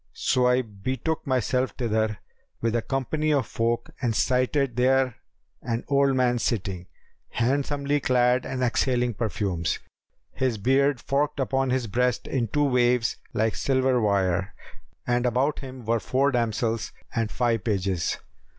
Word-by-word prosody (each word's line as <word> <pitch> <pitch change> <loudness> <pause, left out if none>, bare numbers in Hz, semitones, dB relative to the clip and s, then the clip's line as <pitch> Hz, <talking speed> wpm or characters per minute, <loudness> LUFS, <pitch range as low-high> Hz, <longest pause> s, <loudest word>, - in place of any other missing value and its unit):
So 125 -1 +2
I 125 +1 +3
betook 130 +10 -3
myself 130 0 0
thither 110 -3 0 0.4
with 115 0 0
a 120 - +2
company 145 +5 -1
of 140 -5 +2
folk 115 +1 -1
and 120 -4 0
sighted 130 +1 +1
there 130 0 +2 0.4
an 115 0 -2
old 140 -1 +3
man 125 -1 +2
sitting, 95 -6 -2 0.4
handsomely 140 +3 0
clad 125 -1 +2
and 130 0 -3
exhaling 125 0 +1
perfumes. 100 -6 -1 0.6
His 130 -4 0
beard 135 +4 +2
forked 140 +5 -1
upon 135 0 0
his 130 -1 0
breast 125 +3 0
in 120 -4 -1
two 145 +6 +1
waves 125 -3 +2 0.2
like 110 0 +1
silver 130 -2 +1
wire, 95 -2 +1 0.5
and 120 0 +1
about 130 +5 +1
him 130 -3 -9
were 115 +1 +1
four 135 +5 +1
damsels 115 -1 -1 0.2
and 115 -2 0
five 115 -4 0
pages. 95 -5 0
125 Hz, 140 wpm, -25 LUFS, 115-130 Hz, 0.6 s, I